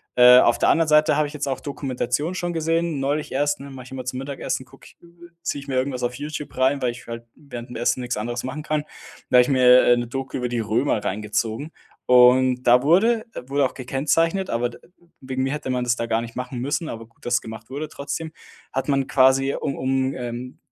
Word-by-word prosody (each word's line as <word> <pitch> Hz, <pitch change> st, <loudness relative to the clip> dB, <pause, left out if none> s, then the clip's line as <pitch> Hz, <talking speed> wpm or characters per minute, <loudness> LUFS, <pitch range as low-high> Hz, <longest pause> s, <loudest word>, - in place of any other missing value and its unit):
Äh, 125 Hz, 0 st, +9 dB
auf 120 Hz, -, +4 dB
der -, -, +2 dB
anderen 165 Hz, -1 st, +3 dB
Seite 150 Hz, -1 st, +4 dB
habe 150 Hz, -1 st, +2 dB
ich 145 Hz, -, -11 dB
jetzt 145 Hz, -1 st, -4 dB
auch 135 Hz, -1 st, -2 dB
Dokumentationen 140 Hz, +3 st, -3 dB
schon 175 Hz, -1 st, -3 dB
gesehen, 165 Hz, -1 st, 0 dB
neulich 145 Hz, +2 st, -1 dB
erst, 145 Hz, +1 st, 0 dB
ne, 140 Hz, 0 st, -9 dB
mache 130 Hz, -2 st, -9 dB
ich -, -, -14 dB
immer 130 Hz, -1 st, -6 dB
zum 130 Hz, +1 st, -4 dB
Mittagessen 135 Hz, -1 st, -4 dB
gucke 135 Hz, +2 st, -18 dB
ich -, -, -17 dB
äh, 170 Hz, 0 st, -17 dB
ziehe 145 Hz, -, -2 dB
ich 140 Hz, -, -13 dB
mir 135 Hz, -, -3 dB
irgendwas 130 Hz, 0 st, -1 dB
auf 120 Hz, 0 st, -1 dB
Youtube 150 Hz, +1 st, -6 dB
rein, 135 Hz, +2 st, +2 dB
weil 125 Hz, -, +1 dB
ich 120 Hz, -, -12 dB
halt 115 Hz, 0 st, -7 dB
während 125 Hz, -5 st, -9 dB
dem -, -, -9 dB
Essen 120 Hz, +1 st, 0 dB
nichts 125 Hz, 0 st, -3 dB
anderes 120 Hz, +3 st, -3 dB
machen 150 Hz, +4 st, -5 dB
kann. 155 Hz, -1 st, -1 dB, 0.5 s
Da -, -, +2 dB
habe -, -, +9 dB
ich 125 Hz, -, 0 dB
mir, 125 Hz, -1 st, +6 dB
äh, 120 Hz, 0 st, +5 dB
'ne 120 Hz, -1 st, -2 dB
Doku 135 Hz, +1 st, -4 dB
über 125 Hz, -1 st, -2 dB
die 120 Hz, -1 st, -2 dB
Römer 110 Hz, +1 st, 0 dB
reingezogen. 110 Hz, -, -2 dB, 0.3 s
Und 125 Hz, 0 st, +5 dB
da 125 Hz, 0 st, +5 dB
wurde 220 Hz, +9 st, +3 dB, 0.2 s
wurde 140 Hz, 0 st, +1 dB
auch -, -, -3 dB
gekennzeichnet, 165 Hz, +8 st, 0 dB
aber 120 Hz, +1 st, 0 dB
d -, -, -13 dB, 0.4 s
wegen 130 Hz, 0 st, -3 dB
mir 135 Hz, -, -1 dB
hätte 150 Hz, -3 st, -5 dB
man 125 Hz, -1 st, 0 dB
das 120 Hz, 0 st, +1 dB
da 115 Hz, -, -2 dB
gar 115 Hz, 0 st, 0 dB
nicht 115 Hz, -1 st, -8 dB
machen 125 Hz, 0 st, -5 dB
müssen, 145 Hz, +5 st, -2 dB
aber 115 Hz, 0 st, -7 dB
gut, 115 Hz, -, -24 dB
dass 120 Hz, 0 st, +1 dB
gemacht 110 Hz, +1 st, -10 dB
wurde 145 Hz, +3 st, -4 dB
trotzdem 155 Hz, +3 st, -5 dB, 0.4 s
hat 135 Hz, -, -2 dB
man 135 Hz, -2 st, +1 dB
quasi, 135 Hz, +1 st, +4 dB
um 140 Hz, -, -2 dB
um, 130 Hz, 0 st, 0 dB
ähm, 125 Hz, +1 st, -6 dB
130 Hz, 235 wpm, -23 LUFS, 125-145 Hz, 0.5 s, Äh